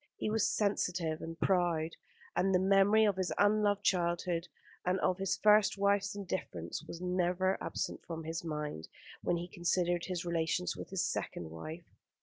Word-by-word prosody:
He 215 - -2
was 220 -1 +2
sensitive 180 -6 0
and 165 0 -7
proud, 175 -4 +2 0.4
and 190 0 +2
the - - +5
memory 195 +3 +5
of 200 -3 +1
his 185 -1 -1
unloved 205 0 +3
childhood 175 -1 +1 0.4
and 185 +1 +1
of 185 +1 +1
his 195 -1 0
first 210 -1 +5
wife's 200 0 +2
indifference 170 - -4
was 170 - -8
never 180 +1 +1
absent - - -3
from 165 -1 -5
his 160 +1 -4
mind 150 - -4 0.3
when 175 - +1
he 175 +1 -4
considered 175 0 0
his 180 -1 -3
relations 165 - 0
with - - -8
his - - 0
second 80 -2 -3
wife. 155 - -8
180 Hz, 160 wpm, -33 LUFS, 165-195 Hz, 0.4 s, the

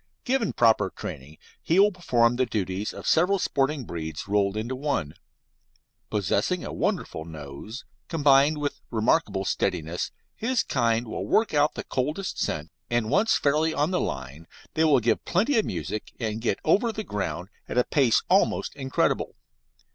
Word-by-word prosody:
Given 255 -4 +1
proper 110 -5 +4
training, 75 -2 -8 0.2
he 165 - +1
will 205 +1 +6
perform 120 - +2
the 130 0 +1
duties 100 -2 -2
of - - -9
several 180 +5 +3
sporting 140 -4 0
breeds 80 -2 -5
rolled 100 0 +1
into 120 +4 -3
one. 130 - -2 1.0
Possessing 105 -4 0
a - - -5
wonderful 80 - -2
nose, 80 - -9 0.2
combined 145 -1 +4
with 145 -1 -3
remarkable 110 -4 +1
steadiness, 80 0 -1 0.3
his 250 +2 0
kind 115 0 +1
will - - -4
work 220 -5 +2
out 150 +1 +3
the - - -4
coldest 150 +9 -2
scent, 75 +1 -2 0.2
and 120 -2 0
once 225 +2 +3
fairly 155 +3 +1
on 150 +4 +1
the 180 - +1
line 70 +4 -5 0.3
they 160 - +2
will 145 -4 +5
give 115 - +1
plenty 225 +8 +2
of 215 - 0
music 90 +5 -4
and 110 -2 -2
get 110 -4 0
over 210 +9 +3
the 215 0 -5
ground 100 - -4 0.2
at - - -3
a 125 - +5
pace 130 -5 +3
almost - - +2
incredible. 135 -2 0
120 Hz, 160 wpm, -26 LUFS, 100-155 Hz, 1.0 s, will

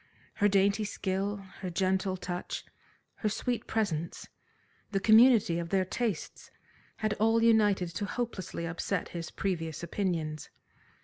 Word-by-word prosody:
Her 205 - +4
dainty 200 +1 +3
skill, 195 0 -2
her 185 - -4
gentle 190 +1 0
touch, 180 -1 -5 0.5
her 215 - 0
sweet 240 +3 -2
presence, 170 -7 -2 0.6
the 195 - 0
community 220 -4 +6
of 170 -1 -4
their 190 0 +2
tastes, 220 -2 -3 0.5
had 215 -1 0
all 225 +1 +3
united 210 -6 +4
to 205 +4 -3
hopelessly 205 -7 -4
upset 175 +2 -2
his 170 -1 -5
previous 165 -5 -3
opinions. 165 -4 -2
195 Hz, 125 wpm, -30 LUFS, 175-215 Hz, 0.6 s, community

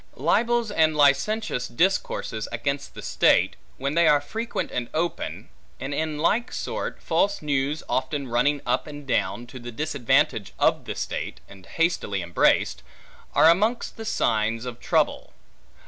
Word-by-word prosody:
Libels 235 -2 +1
and 160 -5 +2
licentious 145 - +2
discourses 120 - 0
against 140 0 -3
the - - -8
state, - - +3 0.2
when 140 +2 -2
they 170 0 +4
are 145 - +6
frequent 225 +11 -4
and 120 -1 -3
open; 170 +2 -3 0.3
and 135 +2 -4
in 155 +1 -2
like 215 +10 +1
sort, - - -4
false 200 -4 0
news 145 +1 -1
often 135 +1 -1
running 125 +4 +1
up 125 +3 0
and 145 -1 -9
down, 120 -2 -1
to 130 +2 -10
the 120 0 -7
disadvantage 140 - +1
of - - +2
the - - -4
state, - - -4
and 95 -2 -15
hastily 165 - 0
embraced; 85 -6 +2 0.5
are - - +7
amongst 210 +8 +2
the 225 - -7
signs 115 - 0
of 120 -1 -6
troubles. - - 0
145 Hz, 145 wpm, -25 LUFS, 120-165 Hz, 0.5 s, are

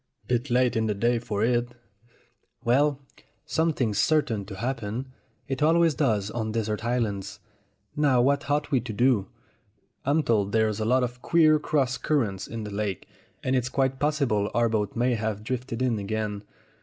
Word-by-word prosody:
"Bit 125 +2 0
late 125 0 +2
in 110 0 +1
the 105 - 0
day 120 +3 +1
for 110 -3 -2
it." 120 +1 +1 0.9
"Well, 140 +4 +2 0.5
something's 140 -10 0
certain 120 -10 +1
to 100 0 -8
happen. 120 +2 -3 0.4
It 135 0 -3
always 165 +1 +4
does 110 -8 0
on 110 -1 -3
desert 110 -1 -2
islands. 100 -5 -2 0.6
Now 145 -4 +3
what 140 +3 +2
ought 145 0 0
we 135 - +3
to 115 -1 -6
do?" 120 -3 +2 0.8
"I'm 150 +3 +2
told 105 -5 +1
there 110 -1 +4
are - - +1
a 110 0 -2
lot 125 +3 +3
of 125 0 -4
queer 155 -2 +4
cross 135 -5 0
currents 115 -11 -1
in 115 -1 -5
the 105 - -6
lake, 100 -2 -3 0.4
and 130 0 +1
it's 125 -1 0
quite 135 0 0
possible 135 -9 +1
our 120 0 +3
boat 105 -3 -1
may 120 +2 +2
have 110 -2 -2
drifted 125 0 -3
in 120 -4 +1
again. 105 0 -3
120 Hz, 170 wpm, -26 LUFS, 110-135 Hz, 0.9 s, always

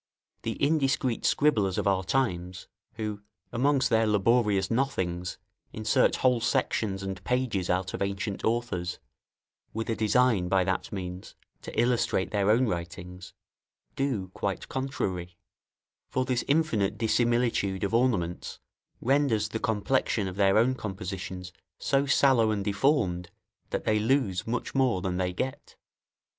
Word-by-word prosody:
The 115 - -2
indiscreet 140 -4 +1
scribblers 105 -11 +2
of - - -1
our 95 -1 +2
times, 90 -6 -1 0.3
who, 105 -2 -4 0.3
amongst 135 +2 +2
their 110 -1 +3
laborious 105 -2 +2
nothings, 90 -9 -1 0.4
insert 110 0 +2
whole 125 -2 +2
sections 100 -3 0
and 95 -1 -5
pages 125 -8 -1
out 90 +1 0
of - - -5
ancient 100 +1 -2
authors, 110 -6 -1 0.8
with 115 +1 -2
a - - 0
design, 110 -4 +2
by 95 -1 +3
that 95 0 -2
means, 90 -2 -6 0.3
to - - -5
illustrate 120 -5 +1
their 100 -1 +1
own 120 +4 +4
writings, 90 0 -6 0.6
do 125 -10 -1
quite - - -3
contrary; 95 -10 -3 0.7
for 130 0 0
this 125 -1 0
infinite 130 -10 +1
dissimilitude 115 -4 +1
of 100 - -1
ornaments 110 -8 0 0.4
renders 125 -5 +2
the 110 - -3
complexion 110 -1 0
of 90 - -5
their 100 0 +4
own 120 +4 +4
compositions 95 -5 -6 0.2
so 140 0 +1
sallow 130 -5 +4
and 100 -2 -1
deformed, 100 - +1 0.4
that - - -2
they 110 0 +2
lose 110 -6 +1
much 120 +2 -2
more 130 -7 +2
than 90 -1 -1
they 90 -1 0
get. 130 +9 -5
105 Hz, 135 wpm, -28 LUFS, 95-125 Hz, 0.8 s, own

